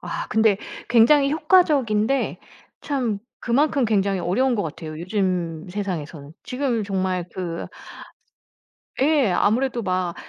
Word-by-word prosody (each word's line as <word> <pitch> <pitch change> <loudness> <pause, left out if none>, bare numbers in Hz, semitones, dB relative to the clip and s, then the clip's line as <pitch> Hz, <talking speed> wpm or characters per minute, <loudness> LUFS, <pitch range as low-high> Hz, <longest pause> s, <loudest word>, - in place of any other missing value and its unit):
아 - - -5
근데 220 -2 +3 0.3
굉장히 275 +5 +5
효과적인데 280 - +2 0.4
참 250 -8 -2 0.2
그만큼 275 +2 +1
굉장히 200 -3 +1
어려운 250 +9 +1
것 205 - -1
같아요, 155 0 -7
요즘 180 -3 -2
세상에서는. 165 -7 -5
지금 250 -5 -1
정말 185 -2 -1
그 170 -2 -4 1.3
예. 280 -6 +3
아무래도 240 +4 +1
막 185 -2 -1
210 Hz, 250 characters per minute, -23 LUFS, 185-265 Hz, 1.3 s, 굉장히